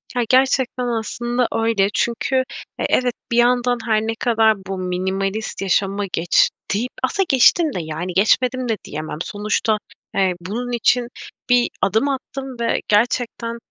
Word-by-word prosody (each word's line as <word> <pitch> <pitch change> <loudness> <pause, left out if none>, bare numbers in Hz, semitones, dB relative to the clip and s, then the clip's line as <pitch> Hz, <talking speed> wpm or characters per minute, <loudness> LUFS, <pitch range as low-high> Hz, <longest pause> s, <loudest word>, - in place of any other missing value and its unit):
Ya, 245 - +2
gerçekten 260 -1 +2
aslında 240 +1 -1
öyle. 225 -3 +2
Çünkü, 235 +3 -1 0.4
eee, - - 0
evet, 250 -1 +2 0.2
bir 235 - +1
yandan 245 0 +3
her 215 -2 +2
ne 225 +1 -2
kadar 225 -2 +3
bu 195 - -3
minimalist 190 +4 -2
yaşama 195 +1 0
geç 170 +1 +3 0.2
deyip 240 +5 -1
aslında 385 +9 +1
geçtim 285 +4 +4
de, 180 - -3
yani, 160 +3 -5
geçmedim 250 +6 +2
de 220 - 0
diyemem. 155 0 -5
Sonuçta, 210 +2 0 0.4
eee, 190 -2 +2
bunun 235 +7 -4
için 240 +1 +2 0.4
bir 245 -1 +4
adım 220 +8 +2
attım 265 -1 -5
ve 230 - 0
gerçekten 235 +1 0
230 Hz, 145 wpm, -20 LUFS, 195-245 Hz, 0.4 s, geçtim